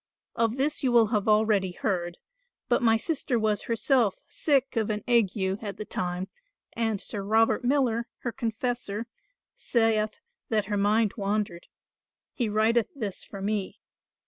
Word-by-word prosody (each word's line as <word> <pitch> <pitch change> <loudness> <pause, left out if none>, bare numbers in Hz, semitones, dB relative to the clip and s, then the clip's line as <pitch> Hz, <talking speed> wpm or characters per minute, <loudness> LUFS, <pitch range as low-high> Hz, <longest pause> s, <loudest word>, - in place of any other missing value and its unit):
Of 230 +1 +1
this 290 +3 0
you 260 - +1
will 235 -2 +5
have 210 -3 0
already 210 -3 +3
heard: 175 -3 -2 0.5
but 240 - +2
my 225 -2 +4
sister 270 -1 -1
was 215 -2 0
herself 230 -2 +2
sick 275 -4 +1
of 225 -2 0
an 210 -1 -2
ague 230 -5 +3
at 195 +1 -2
the 215 - -5
time 180 0 -3 0.5
and 225 -3 -1
Sir 200 - -4
Robert 220 +5 +2
Miller, 245 -3 +1
her 240 - -2
confessor, 230 -2 -3 0.5
saith 220 -2 +1 0.3
that 215 -2 +1
her 205 +1 -1
mind 210 +1 +2
wandered. 200 -4 -2 0.7
He 235 -4 -1
writeth 220 +2 +2
this 210 -8 -4
for 195 -1 -8
me. 205 -1 -2
220 Hz, 145 wpm, -27 LUFS, 205-235 Hz, 0.7 s, will